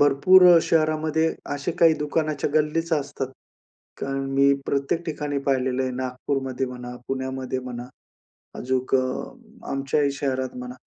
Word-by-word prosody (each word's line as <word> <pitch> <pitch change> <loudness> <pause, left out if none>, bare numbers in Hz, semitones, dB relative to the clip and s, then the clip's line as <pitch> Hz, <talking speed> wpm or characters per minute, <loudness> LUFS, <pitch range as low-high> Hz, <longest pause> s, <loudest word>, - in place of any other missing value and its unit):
भरपूर 145 +6 +6
अ, - - +8
शहरामध्ये 155 0 +1 0.2
असे 145 +4 -3
काही 165 -1 +5
दुकानाच्या 150 0 -1
गल्लीच 155 +2 +1
असतात 140 -3 -1 0.7
कारण 135 0 -2
मी 140 +1 +4
प्रत्येक 140 +5 -1
ठिकाणी 150 -3 -2
पाहिलेलं 130 -1 +1
आहे. 130 - -1
नागपूरमध्ये 130 +1 -3
म्हणा, 125 -1 -7
पुण्यामध्ये 130 -1 -3
म्हणा. 125 -1 -7 0.7
अजून 130 +1 -1
अ, - - +3 0.7
आमच्याही 140 +1 +1
शहरात 130 -2 -2
म्हणा. 125 0 -7
140 Hz, 125 wpm, -24 LUFS, 130-150 Hz, 0.7 s, अ